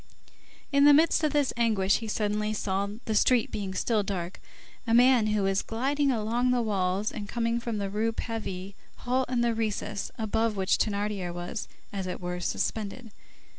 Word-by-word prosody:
In 280 0 +5
the 290 -1 +8
midst 320 +1 +4
of 305 - +2
this 290 -3 +1
anguish, 215 -5 +2
he 225 - -6
suddenly 210 0 -1
saw, 200 -1 -1 0.2
the 220 - -1
street 235 +2 +3
being 195 -2 -4
still 220 +1 +1
dark, 185 -3 -4 0.5
a 230 - +3
man 245 -2 +5
who 210 -1 +1
was 195 0 +1
gliding 275 +5 0
along 235 +2 0
the 250 -1 +2
walls 195 -1 0
and 205 -2 -6
coming 235 0 0
from 235 -2 -3
the 200 -1 -2
Rue 215 +3 0
Pavée, 200 -5 -5 0.2
halt 255 +1 -1
in 245 -2 +1
the 235 -1 +2
recess 215 -2 -2
above 220 0 0
which 190 -1 +2
Thénardier 205 -3 -1
was, 175 +4 -5 0.3
as 195 -2 -3
it 180 - -4
were, 180 0 -4
suspended. 220 +5 -3
215 Hz, 175 wpm, -28 LUFS, 200-235 Hz, 0.5 s, the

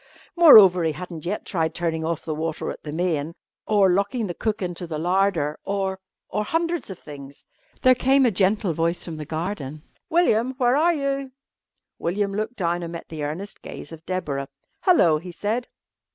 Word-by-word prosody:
Moreover, 210 - +8
he 160 -1 +1
hadn't 170 -1 -7
yet 205 +4 -3
tried 165 -3 -1
turning 165 -2 -1
off 165 0 -3
the 155 - -2
water 160 +1 -3
at - - -10
the 150 - -7
main, 165 -1 -1 0.3
or 205 -2 +4
locking 200 +5 0
the 175 - -4
cook 215 +4 -2
into 175 -1 -4
the 160 -2 -4
larder, 175 -3 +1
or 195 -1 -2 0.3
or 210 - -2
hundreds 335 +5 -1
of 190 - -7
things. 140 -1 -11 0.4
There 255 - +7
came 265 +2 +3
a 240 - +3
gentle 195 -1 +1
voice 165 +2 -1
from 165 -3 -6
the 155 - -6
garden. 155 -3 -4 0.3
"William, 260 -7 +2
where 250 -1 +3
are 335 +4 +3
you?" 275 -2 -2 0.7
William 200 +3 -1
looked 215 +4 -3
down 175 -3 -1
and 170 0 -6
met 170 - -8
the 155 -2 -5
earnest 170 +8 -5
gaze - - -9
of 165 -1 -10
Deborah. 145 -7 -2 0.3
"Hello," 170 - +4
he 180 +2 -9
said. 215 +8 -2
185 Hz, 180 wpm, -24 LUFS, 160-215 Hz, 0.7 s, Moreover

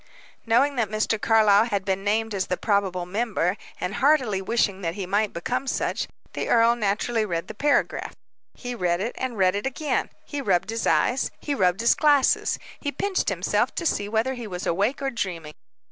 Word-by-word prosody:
Knowing 265 +5 +3
that 225 -4 +1
Mr. 215 0 -1
Carlyle 215 -2 +5
had 200 -5 -2
been 195 -1 -1
named 220 +2 0
as 190 -2 -1
the 180 - -1
probable 195 -4 0
member, 200 -2 -1 0.2
and 180 - -3
heartily 260 -9 +2
wishing 200 -2 0
that 165 -1 -2
he 200 -2 -4
might 205 +3 0
become 245 +10 -3
such, - - -1 0.3
the - - -3
earl 230 0 +5
naturally 220 +1 0
read 170 -5 -3
the - - -7
paragraph. 285 +6 0 0.4
He 245 -1 -6
read 180 -6 0
it, 220 +5 -2
and 255 -3 -3
read 185 -1 +3
it 205 +6 -2
again; 285 +3 -1 0.2
he 290 -1 -4
rubbed 195 -3 +1
his 225 0 -2
eyes, 260 +2 +2
he 290 - -3
rubbed 185 -5 +1
his 235 - +5
glasses, 290 -3 +3 0.2
he 285 - -3
pinched 380 +7 -1
himself, - - 0
to 340 - -3
see 205 -9 0
whether 225 +4 0
he 240 -3 -7
was 180 -2 -5
awake 205 +11 0
or 270 - 0
dreaming. 175 -9 -4
215 Hz, 190 wpm, -25 LUFS, 190-245 Hz, 0.4 s, Carlyle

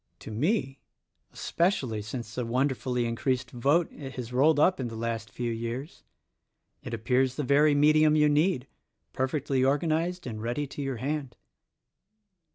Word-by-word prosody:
To - - -8
me, 135 - 0 0.5
especially 135 - 0
since 115 +2 -6
the 125 - -2
wonderfully 125 0 0
increased 125 +2 -1
vote 145 +8 +2
it 135 -3 -8
has 125 -1 -6
rolled 145 +4 +4
up 180 +3 +4
in 125 - -2
the 115 - -7
last 115 -1 -3
few 120 +4 -3
years, 115 +6 -5 0.8
it 125 - -7
appears 125 +3 +1
the 150 - -2
very 145 +3 +4
medium 155 +1 +5
you 150 -1 +5
need, 150 -2 +2 0.5
perfectly 130 0 0
organized 160 +6 0
and 110 -4 -5
ready 120 +6 -2
to 140 +1 -7
your 135 -3 -3
hand." 135 +1 -3
130 Hz, 150 wpm, -28 LUFS, 120-150 Hz, 0.8 s, medium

